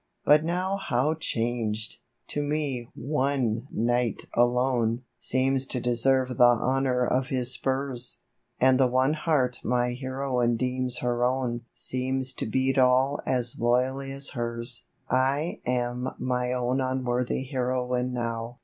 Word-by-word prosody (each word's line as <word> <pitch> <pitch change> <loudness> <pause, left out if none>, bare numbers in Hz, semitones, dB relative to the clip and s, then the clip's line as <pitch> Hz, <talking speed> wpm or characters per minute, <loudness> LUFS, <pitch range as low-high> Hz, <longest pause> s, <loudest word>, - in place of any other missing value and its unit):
But 150 +1 +6
now 180 +4 -1
how 150 -4 +1
changed! 115 -7 -2 0.3
To 145 - -2
me 145 -5 -2
o?ie 135 -4 0
knight 120 0 0
alone 120 -1 +2 0.2
Seems 130 +1 +1
to 125 - -2
deserve 125 +1 +1
the - - +7
honour 125 +1 +3
of 130 +1 +1
his 130 -1 0
spurs; 130 -2 -2 0.4
And 130 0 +5
the 130 - +5
one 130 +3 +2
heart 150 -6 +1
my 120 +1 +1
heroine 130 -2 -1
deems 125 0 -1
her 120 0 0
own 125 -2 0
Seems 130 +2 -2
to - - -4
beat 130 +4 +1
all 130 +2 +3
as 120 -2 -1
loyally 130 +3 +1
as 140 +1 -3
hers! 120 0 -4
/ - - -16 0.6
am 125 0 -1
my 125 -1 -1
own 125 +1 0
unworthy 130 -1 -1
heroine 125 -1 -1
now. 115 -1 -3
125 Hz, 130 wpm, -27 LUFS, 120-135 Hz, 0.6 s, the